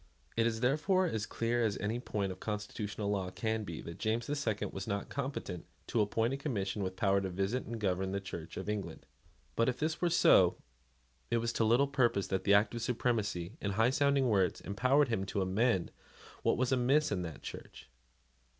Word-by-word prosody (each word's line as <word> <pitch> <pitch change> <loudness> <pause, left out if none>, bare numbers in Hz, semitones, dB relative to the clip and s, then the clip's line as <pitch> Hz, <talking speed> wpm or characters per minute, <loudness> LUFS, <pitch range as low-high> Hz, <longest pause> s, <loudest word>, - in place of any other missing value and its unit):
It 115 0 +3
is 110 -1 -2
therefore 155 +9 +2
as 110 - -2
clear 120 +1 0
as 105 -3 0
any 110 +4 -2
point 100 -5 -2
of 90 - -8
constitutional 105 0 -3
law 95 -3 -1
can 110 +3 -2
be 85 -5 -6
that 85 - -8
James 115 +2 0
the 145 - -2
Second 110 -8 -2
was 95 -1 -5
not 100 -1 -2
competent 130 - -4 0.2
to 115 - +1
appoint 115 +4 +1
a - - -1
Commission 105 -8 -2
with 95 -1 -3
power 100 0 +2
to 95 - -2
visit 100 +7 -1
and 115 0 -5
govern 95 -2 0
the 100 - -1
Church 85 -4 -7
of - - -5
England. 105 -1 -4 0.5
But, 115 - +3
if 125 - -2
this 155 +2 -2
were 175 - +3
so, 95 - +5 0.7
it 120 - +2
was 115 0 -1
to - - +1
little 120 +5 +4
purpose 120 -8 +1
that 95 - -1
the 100 - +5
Act 105 +2 +3
of 120 - -4
Supremacy, 110 - -1
in 100 -1 -1
high 115 +5 +3
sounding 140 -1 +3
words, 95 -5 +2
empowered 130 +8 +2
him 115 -5 0
to 100 - -1
amend 95 0 +1 0.5
what - - +2
was 130 +1 +1
amiss 135 +4 +3
in 95 -3 0
that 80 -4 -7
Church. - - -9
110 Hz, 205 wpm, -33 LUFS, 100-125 Hz, 0.7 s, so